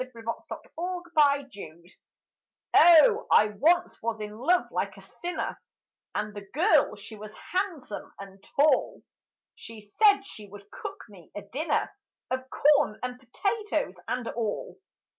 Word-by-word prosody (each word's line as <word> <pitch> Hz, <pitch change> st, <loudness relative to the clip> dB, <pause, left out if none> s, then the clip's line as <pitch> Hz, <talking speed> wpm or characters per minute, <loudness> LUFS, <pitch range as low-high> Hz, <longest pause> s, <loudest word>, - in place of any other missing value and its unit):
GREEN 235 Hz, -3 st, -14 dB
CORN 230 Hz, +8 st, -3 dB
AND 350 Hz, 0 st, -6 dB
POTATOES 255 Hz, -, 0 dB, 0.8 s
Oh 425 Hz, +8 st, +7 dB
I 215 Hz, -, +5 dB
once 345 Hz, -, +2 dB
was 225 Hz, -1 st, -2 dB
in 210 Hz, 0 st, -6 dB
love 345 Hz, +11 st, +2 dB
like -, -, -2 dB
a -, -, -12 dB
sinner, 355 Hz, 0 st, -5 dB, 0.5 s
And 210 Hz, 0 st, -2 dB
the 205 Hz, -, -7 dB
girl 355 Hz, +8 st, +3 dB
she 220 Hz, -, -10 dB
was 215 Hz, 0 st, -10 dB, 0.2 s
hahn'some 365 Hz, -, -3 dB
and 195 Hz, 0 st, -11 dB
tall, 290 Hz, -1 st, +2 dB, 0.5 s
She 215 Hz, -2 st, -12 dB
said 405 Hz, -2 st, +6 dB
she 215 Hz, -, -10 dB
would 200 Hz, +1 st, -14 dB
cook -, -, -8 dB
me 185 Hz, -6 st, -16 dB
a 205 Hz, -, -6 dB
dinner 275 Hz, +11 st, -1 dB, 0.4 s
Of 260 Hz, 0 st, -3 dB
corn 285 Hz, -8 st, +3 dB
and 250 Hz, 0 st, -4 dB
potatoes 355 Hz, -, -2 dB
and 250 Hz, -2 st, -2 dB
all. 240 Hz, -, -4 dB
255 Hz, 140 wpm, -27 LUFS, 210-345 Hz, 0.8 s, Oh